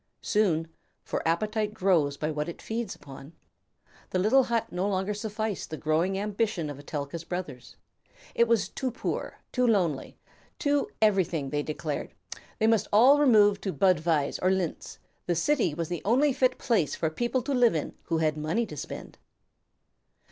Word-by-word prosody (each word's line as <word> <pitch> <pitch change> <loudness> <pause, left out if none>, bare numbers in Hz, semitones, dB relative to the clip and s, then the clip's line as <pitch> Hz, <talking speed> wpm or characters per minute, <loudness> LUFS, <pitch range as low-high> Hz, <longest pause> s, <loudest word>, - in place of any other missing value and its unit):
Soon 175 -7 +1 0.4
for - - -3
appetite 210 +5 0
grows 160 -7 +2
by 155 0 -2
what 150 +1 -3
it 170 - -8
feeds 225 -2 -4
upon 140 +2 -12 0.8
the - - -1
little 225 +8 +4
hut 230 -1 -1
no 185 +3 -1
longer 190 +1 -1
sufficed 215 0 -4
the 155 - -5
growing 165 +5 0
ambition 205 -5 -1
of 140 - -9
Etelka's 145 +2 -5
brothers. 165 -7 -6 0.6
It 235 - +3
was 225 -4 +2
too 260 +6 -3
poor, 245 - -4
too 250 -1 +2
lonely, 175 - 0 0.4
too 285 -1 +1
everything, 175 -9 +2
they 145 - 0
declared; 150 0 -4 0.4
they 220 - +1
must 225 -1 +3
all 255 +8 +6
remove 210 -8 +5
to 195 - -2
Budweis 165 -6 +2
or 185 - +3
Linz; 185 -4 -2 0.3
the 175 - +1
city 180 - +1
was 165 0 -2
the 175 -3 -3
only 260 +7 +3
fit 255 0 +2
place 205 - +1
for 160 - -1
people 240 +7 -1
to 280 - -2
live 245 -7 +4
in 155 - -3
who 165 - 0
had 155 -2 +1
money 160 +10 0
to 150 -8 -9
spend. - - -8
190 Hz, 165 wpm, -28 LUFS, 160-225 Hz, 0.8 s, all